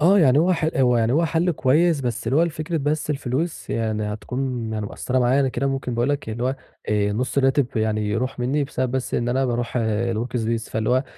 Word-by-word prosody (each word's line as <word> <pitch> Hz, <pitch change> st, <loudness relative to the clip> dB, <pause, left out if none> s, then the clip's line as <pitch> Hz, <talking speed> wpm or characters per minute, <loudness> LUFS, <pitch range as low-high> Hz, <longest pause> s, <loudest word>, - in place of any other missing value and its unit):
آه 185 Hz, +6 st, +5 dB
يعني 140 Hz, -6 st, +5 dB
هو 175 Hz, +4 st, +4 dB
ح 160 Hz, -2 st, +1 dB
هو 125 Hz, -2 st, +4 dB
يعني 115 Hz, +1 st, +2 dB
هو 165 Hz, +4 st, +3 dB
حل 165 Hz, +2 st, +1 dB
كويّس 155 Hz, +2 st, +2 dB
بس 120 Hz, -3 st, -3 dB
اللي 130 Hz, -, +2 dB
هو 165 Hz, -, +5 dB
لفكرة 160 Hz, 0 st, -2 dB
بس 150 Hz, +1 st, -1 dB
الفلوس 145 Hz, +3 st, -2 dB
يعني 110 Hz, -2 st, -1 dB
هتكون 125 Hz, -1 st, -3 dB
يعني 105 Hz, -1 st, -2 dB
مأثّرة 130 Hz, +4 st, -2 dB
معايا، 125 Hz, +3 st, +3 dB
أنا 135 Hz, -, +2 dB
كده 130 Hz, +2 st, -1 dB
ممكن 135 Hz, -2 st, -2 dB
باقول 120 Hz, +3 st, +1 dB
لك 145 Hz, -5 st, -2 dB
اللي 115 Hz, +2 st, -4 dB
هو، 130 Hz, +2 st, 0 dB, 0.3 s
آآ 105 Hz, -1 st, +1 dB
نُص 125 Hz, +5 st, -1 dB
الراتب 135 Hz, 0 st, +3 dB
يعني 110 Hz, -1 st, 0 dB
يروح 120 Hz, +6 st, -2 dB
مِنّي 135 Hz, +4 st, 0 dB
بسبب 130 Hz, -2 st, -2 dB
بس 130 Hz, -1 st, -2 dB
إن 120 Hz, 0 st, 0 dB
أنا 130 Hz, +2 st, +1 dB
باروح 120 Hz, 0 st, -1 dB
الWorkspace 115 Hz, +1 st, -1 dB
فاللي 110 Hz, +1 st, -1 dB
هو، 130 Hz, +2 st, +2 dB
130 Hz, 220 wpm, -23 LUFS, 115-145 Hz, 0.3 s, آه